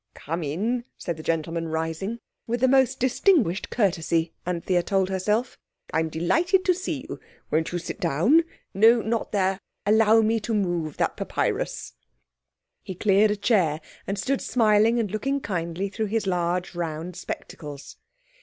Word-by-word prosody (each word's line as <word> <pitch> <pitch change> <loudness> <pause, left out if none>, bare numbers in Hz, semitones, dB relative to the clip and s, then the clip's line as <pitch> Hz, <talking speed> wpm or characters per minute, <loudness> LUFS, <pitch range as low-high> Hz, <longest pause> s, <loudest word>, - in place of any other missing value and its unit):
"Come 165 +4 -4
in," 215 - -1
said 170 -3 -4
the - - -7
gentleman, 165 +1 -2
rising—with 175 +9 -4
the 260 - +4
most 265 -1 +3
distinguished 255 - +2
courtesy, 170 -6 0
Anthea 180 0 0
told 190 +1 0
herself. 210 +6 -1 0.3
"I - - +2
am 160 0 0
delighted 340 - +1
to 365 - +4
see 370 +2 -4
you. - - -7 0.3
Won't 160 +1 +1
you 175 - -1
sit 175 - -6
down? 185 - +3 0.3
No, 225 +4 +5
not 225 0 -2
there; 190 -2 +1 0.3
allow 220 +1 +5
me 225 +1 +2
to 220 +1 -2
move 175 -7 -1
that - - 0
papyrus." - - -2 0.9
He 190 - -7
cleared 205 +2 +4
a 210 - +1
chair, 190 -8 +2 0.3
and 200 - -2
stood 265 +7 -1
smiling 220 0 +3
and 210 -5 -1
looking 275 +7 -1
kindly 180 -3 -3
through 215 +2 -3
his 220 +1 -1
large, 180 -1 -1
round 170 0 -4
spectacles. 145 -5 -8
195 Hz, 155 wpm, -25 LUFS, 170-225 Hz, 0.9 s, No